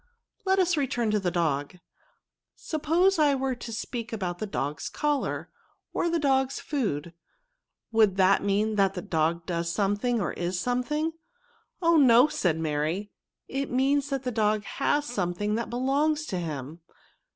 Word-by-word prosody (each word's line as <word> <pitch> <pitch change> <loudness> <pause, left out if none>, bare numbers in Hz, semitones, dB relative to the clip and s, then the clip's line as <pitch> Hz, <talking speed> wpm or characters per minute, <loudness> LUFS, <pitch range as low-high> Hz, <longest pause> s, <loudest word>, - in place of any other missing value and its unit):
"Let 380 0 +3
us 360 -3 +2
return 240 -5 0
to 210 - +2
tho^idpg; 170 -3 -1 0.8
suppose 335 +4 +1
I 290 -2 +4
were 265 0 -1
to 240 -1 -8
speak 230 +1 -5
about 185 -5 -3
the 215 - -3
dog's 150 -6 -3
collar, 295 -2 -1 0.4
or 345 - 0
the 335 - +1
dog's 270 -3 +1
food, 175 - -2 0.8
would 215 -4 +3
that 190 +1 +4
mean 210 +2 +1
that 195 -1 +3
the 180 - -4
dog 165 +1 0
does 170 -1 -2
something, 205 +5 0
or 180 - -1
is 175 +1 -2
something?" 295 - -1 0.3
" 460 -4 -39
Oh! 335 0 +5
no," 250 -2 +7
said 170 - 0
Mary; 160 +6 -2 0.2
" - - -63
it 275 +1 -3
means 275 +3 +1
that 275 -2 -2
the 250 - -2
dog 215 -2 +1
has 290 +5 0
something 205 -4 -2
that 230 +1 -2
belongs 285 +5 +1
to 185 -10 -3
him. 155 -1 -5
225 Hz, 160 wpm, -27 LUFS, 180-280 Hz, 0.8 s, no